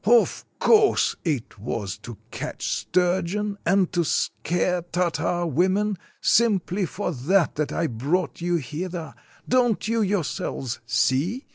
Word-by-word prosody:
Of 235 +3 +3
course, 425 -2 +4
it 140 - -2
was 100 -3 -3
to 120 -3 -9
catch - - -5
sturgeon 190 +3 0
and 185 0 +3
to 175 -1 +2
scare 175 +3 0
Tartar 175 0 -1
women; 190 +7 +1 0.3
simply 200 -4 +2
for 195 +1 -3
that 170 +6 +2
that 150 -1 -2
I 165 - 0
brought 155 +9 -1
you 175 0 +1
hither. 165 +3 -4 0.3
Don't 245 -4 +2
you 230 0 +1
yourselves 180 - -2
see? 160 - +1
180 Hz, 125 wpm, -24 LUFS, 155-200 Hz, 0.3 s, course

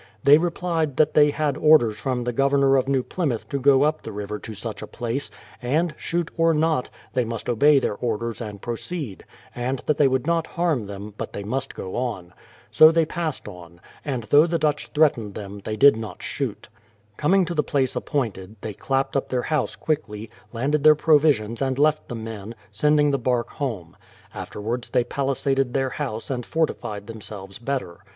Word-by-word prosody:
They 145 +2 +7
replied 165 -4 -1
tliat 155 -1 +3
they 150 -1 +6
had 145 -1 -1
orders 150 -9 +5
from 125 -1 -2
the 120 0 -2
Governor 135 +1 +3
of 135 0 +2
New 135 -2 +1
Plymouth 140 -10 -2
to 140 - -2
go 135 0 +5
up 155 +1 +1
the 110 - -7
river 105 0 -5
to 110 - -8
such 105 -1 -6
a - - -6
place, 120 0 -4 0.3
and, 155 +7 0
shoot 170 0 -2
or 165 -1 +3
not, 155 -4 +1 0.2
they 125 - +2
must 115 -1 -5
obey 140 +5 +5
their 130 - +1
orders 115 +1 -3
and 105 -3 -6
proceed; 120 - -5 0.3
and 125 +2 -2
that 150 - +1
they 145 - +6
would 130 0 0
not 165 0 +1
harm 160 - -1
them, 100 +1 -8
but - - -5
they 100 - -5
must 135 +6 -3
go 95 - -6
on. 110 -8 -3 0.4
So 155 0 +8
they 165 -1 +3
passed 160 -3 -4
on, 85 -1 -11 0.2
and 125 -6 -3
tliough 150 +4 +5
the 170 - +1
Dutch 150 -2 0
threatened 135 -10 +1
them 100 -1 -7
they 110 - -3
did 140 0 +7
not 110 -1 -7
shoot. - - -4 0.5
Coming 185 +5 +3
to 175 - -4
the 155 - +2
place 135 -4 0
appointed, 110 -8 -3
they 110 - -5
clapped 135 +6 -1
up 135 - 0
their 125 -1 -1
house 155 -1 -1
quickly, 110 -8 -3 0.2
landed 140 +5 0
their 155 0 +8
provisions 145 -8 +3
and 130 -1 0
left 155 +1 +2
the 120 - -5
men, 110 -1 -7 0.2
sending 150 +7 +3
the 140 - 0
bark 120 0 0
home. 105 - -5 0.4
Afterwards 115 +4 -5
they 125 -2 +2
palisaded 135 0 -1
their 135 -1 0
house 130 -5 -4
and 125 -2 -2
fortified 115 -10 -2
them 110 0 -9
selves 100 -1 -8
better. 120 -9 -4
130 Hz, 190 wpm, -24 LUFS, 110-150 Hz, 0.5 s, So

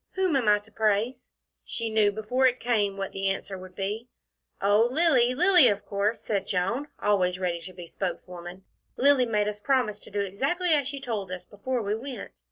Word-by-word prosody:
Whom 375 -5 +1
am 250 -5 +1
I 210 0 +6
to 205 +2 -14
praise?" 220 +4 0 0.3
She 230 -1 -4
knew 215 -2 +3
before 220 +5 +1
it 250 0 0
came 210 -5 0
what 195 -1 -4
the 195 0 -1
answer 195 0 -3
would 185 -1 -11
be. 210 +4 -3 0.5
"Oh, 205 +4 +3
Lilly. 260 -5 +3
Lilly, 355 -2 +6
of 205 -2 0
course," 205 +3 -1
said 200 -2 -2
Joan, 200 +10 -1
always 185 -3 +1
ready 175 -2 -2
to 185 - -9
be 175 -1 -9
spokeswoman. 175 0 -6 0.3
"Lilly 275 -2 +4
made 210 -2 +1
us 210 0 -4
promise 250 -5 +1
to - - -14
do 205 0 -2
exactly 275 - -1
as 290 -4 +3
she 280 -1 -5
told 215 -8 -4
us 185 -1 -6
before 235 +4 -3
we 205 0 -1
went." 245 0 -6
210 Hz, 195 wpm, -27 LUFS, 195-255 Hz, 0.5 s, I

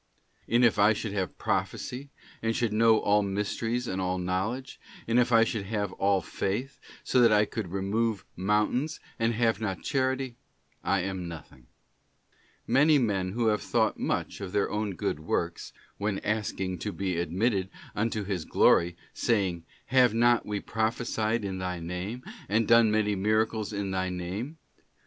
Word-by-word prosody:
And 120 +2 +4
if 110 -3 +3
I 105 +2 +6
should 105 -1 -4
have 95 -3 -2
prophecy, 135 +3 -2 0.3
and 115 0 0
should 120 -4 0
know 110 0 +5
all 105 0 +3
mysteries 105 +4 -2
and 95 -2 -2
all 90 0 -1
knowledge, 95 +9 -3 0.3
and 115 +2 +3
if 125 0 +2
I 115 -1 +6
should 110 -4 -2
have 105 -3 -2
all 100 -1 +2
faith, 120 - -3 0.2
so 125 - +3
that 115 -2 +6
I 105 0 +5
could 105 -1 -4
remove 100 +2 -1
mountains, 105 - 0 0.2
and 115 0 +1
have 115 -2 +1
not 95 -4 -3
Charity, 130 -2 -1 0.5
I 100 -1 +1
am 95 -1 -4
nothing.'* 75 -7 -11 1.0
Many 145 +5 +5
men 95 -7 0
who 115 0 +2
have 105 - +1
thought - - +1
much - - -2
of 95 -2 -6
their 100 - +1
own 105 -2 -2
good 75 - -2
works, 85 +2 -2 0.3
when 100 -1 -1
asking 95 -4 -2
to 105 - -3
be 95 -3 -2
admitted 95 +3 0 0.2
unto 110 0 -1
His 95 -4 -3
glory, 85 +2 +3 0.2
saying, 95 -8 0 0.2
'Have 125 -3 +4
not 120 +1 +3
we 105 -1 -2
prophesied 110 0 -1
in 95 -1 -3
Thy 90 -1 -3
name... 90 +9 -5 0.3
and 110 +2 +2
done 115 -1 +6
many 105 -1 +2
miracles 110 +2 0
in 100 -2 -3
Thy 95 0 -1
name? 95 - -5
105 Hz, 165 wpm, -28 LUFS, 95-115 Hz, 1.0 s, I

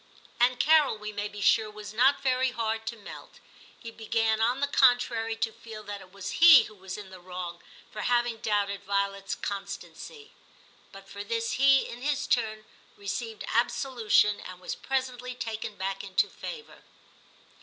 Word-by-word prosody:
And 245 +1 +3
Carol, 305 -6 +4
we 210 0 -6
may 205 0 -3
be 205 0 -9
sure, 220 +1 +3
was 210 0 -9
not 265 +6 +3
very 260 0 +2
hard 225 -2 -3
to 235 - -3
melt. 205 - -12 0.4
He 230 - -9
began, 225 -1 0
on 245 +4 +2
the 285 - +2
contrary, 245 -4 +3
to 225 0 -1
feel 220 -1 -10
that 205 -1 -7
it 185 - -15
was 190 -1 -6
he 330 -5 +10
who - - -11
was 190 -2 -8
in 200 -2 -10
the 185 - -11
wrong 180 -1 -7 0.3
for 210 - -6
having 240 -1 +1
doubted 200 -2 -1
Violet's 200 0 -1
constancy; 200 - -7 0.6
but 195 -1 -13
for 200 +1 -7
this 230 +2 -2
he, 275 0 +4
in 240 - -9
his 285 0 -1
turn, 220 -3 0 0.3
received 205 +2 -5
absolution, 230 -3 +2
and 185 -1 -9
was 180 - -5
presently 255 -2 -3
taken 220 -3 -5
back 195 0 -4
into 195 -1 +1
favour. 455 -2 -9
220 Hz, 165 wpm, -28 LUFS, 200-245 Hz, 0.6 s, he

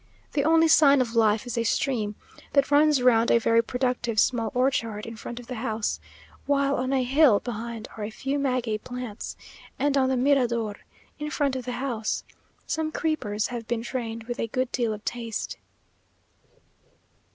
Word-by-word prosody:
The 280 - +1
only 325 +2 +5
sign 285 -3 +6
of 240 -3 0
life 220 0 +3
is 245 -1 -3
a - - +1
stream 220 -3 0 0.4
that 280 0 +3
runs 295 -2 +4
round 235 -2 +4
a - - +6
very 230 0 +3
productive 250 -2 -1
small 230 -1 +2
orchard 230 -5 0
in 230 - -7
front 235 +2 -7
of 245 - -11
the 255 - -6
house, 220 -3 -2 0.5
while 280 -1 +2
on 255 +1 -1
a 265 -2 +2
hill 260 -4 +5
behind 230 -1 -6
are 215 - -5
a 210 - -3
few 270 +5 -3
maguey 250 -5 0
plants, 245 -2 -7 0.4
and 285 +1 +1
on 265 -1 +3
the 260 - +1
mirador, 240 -5 +2 0.4
in 300 0 -3
front 280 -3 0
of 255 - -4
the 250 - -3
house, 240 -4 -2 0.4
some 315 0 -2
creepers 235 -11 -1
have 235 -2 -6
been 230 0 -2
trained 230 -2 -4
with 240 +1 -5
a - - -1
good 255 +2 -2
deal 235 -3 0
of 210 0 -7
taste. 230 -2 -4
245 Hz, 175 wpm, -26 LUFS, 225-275 Hz, 0.5 s, sign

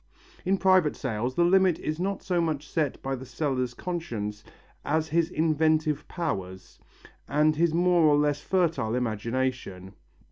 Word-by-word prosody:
In 190 +2 +2
private 185 -5 +3
sales 125 0 -3
the 170 - +3
limit 190 -1 +4
is 155 +1 -4
not 195 +2 -2
so 180 -2 0
much 155 -3 -2
set 155 -3 -1
by 135 0 -2
the 130 - -8
seller's 130 -1 -2
conscience 115 - -4 0.4
as 160 +1 0
his 165 +1 +1
inventive 155 -1 +1
powers, 95 - -5 0.5
and 150 +2 +3
his 165 +1 +2
more 175 +1 +3
or 150 -1 +5
less 145 0 +1
fertile 160 -12 0
imagination. 115 -4 -3
150 Hz, 145 wpm, -27 LUFS, 125-170 Hz, 0.5 s, or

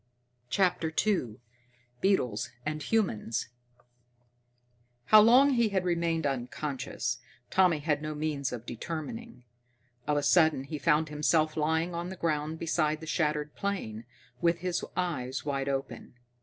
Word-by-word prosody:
CHAPTER 180 -1 +1
II 175 - 0 0.7
Beetles 125 - +1 0.2
and 155 0 -2
Humans 140 - -1 1.6
How 215 0 +8
long 255 +6 +6
he 235 -4 +3
had 190 -2 0
remained 170 -2 0
unconscious, 130 -2 -3 0.3
Tommy 185 -4 +4
had 150 0 -1
no 155 0 -4
means 150 -3 -2
of 120 -1 -6
determining. 165 - -6 0.6
Of 150 -1 +2
a 145 - 0
sudden 155 -2 +4
he 150 +2 -6
found 155 +2 +2
himself 155 +1 +1
lying 160 +3 0
on 170 +1 -3
the 190 - -6
ground 155 -2 -1
beside 155 -2 0
the 160 - -8
shattered 150 -2 -1
plane, 120 - -4 0.4
with 170 -1 +2
his 180 -1 -1
eyes 135 -8 -2
wide 140 -1 -1
open. 135 -2 -4
155 Hz, 130 wpm, -29 LUFS, 140-175 Hz, 1.6 s, How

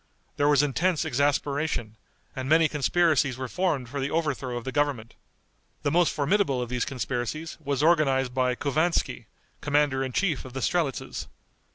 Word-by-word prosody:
There 145 - +3
was 145 -1 +5
intense 160 +4 +1
exasperation, 140 -4 0 0.4
and 130 -1 -4
many 160 +1 +5
conspiracies 150 -2 +2
were 130 0 -4
formed 150 -5 -1
for 140 +4 -5
the 135 +1 -1
overthrow 140 -6 -1
of 120 - -6
the 130 - -4
government. 140 -6 -1 0.7
The 145 - +1
most 175 +1 +3
formidable 145 -2 +1
of 120 -1 -3
these 125 -1 -1
conspiracies 130 +5 -4
was 140 -1 -1
organized 135 -6 +3
by 125 -1 +1
Couvanski, 155 +6 0 0.3
commander 145 -2 +1
in 130 - -3
chief 160 0 0
of 130 - -10
the 135 - -4
strelitzes. 160 -2 -1
140 Hz, 160 wpm, -26 LUFS, 130-155 Hz, 0.7 s, was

